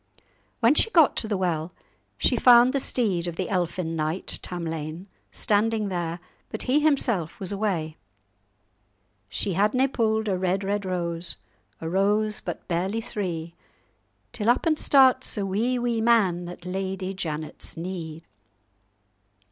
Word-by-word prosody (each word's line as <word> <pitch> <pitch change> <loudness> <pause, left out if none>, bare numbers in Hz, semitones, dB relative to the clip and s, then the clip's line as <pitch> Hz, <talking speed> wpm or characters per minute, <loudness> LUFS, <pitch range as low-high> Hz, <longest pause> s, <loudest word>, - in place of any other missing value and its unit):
When 235 +4 +6
she 380 - +2
got 330 -9 +5
to 220 - -1
the 210 -2 -1
well, 170 -2 -1 0.4
she - - +2
found 245 +1 +6
the 275 - +2
steed 195 -10 0
of 170 - -4
the 185 +1 -3
elfin 175 -2 -1
knight 155 +3 -1
Tamlane 165 -1 -5 0.3
standing 215 0 +1
there, 175 -2 -3 0.3
but 220 - -5
he 260 +4 +3
himself 250 - +1
was 190 -1 -6
away. 190 -7 -2 1.3
"She 195 - -1
hadna 215 +8 +3
pu'd 220 -3 0
a 190 -3 0
red, 185 +1 0
red 200 0 -1
rose, 170 -2 -2 0.4
A 160 - -5
rose 210 +4 +1
but - - -6
barely 190 +5 -1
three; 170 -7 -4 0.8
Till 220 -1 0
up 240 - +3
and 310 -2 +2
starts 260 -3 +4
a 200 - -1
wee, 225 +7 0
wee 240 -2 0
man 190 -7 +2
At 175 0 -10
Lady 190 +1 -3
Janet's 155 -5 -6
knee. 165 -2 -6
190 Hz, 140 wpm, -25 LUFS, 175-225 Hz, 1.3 s, When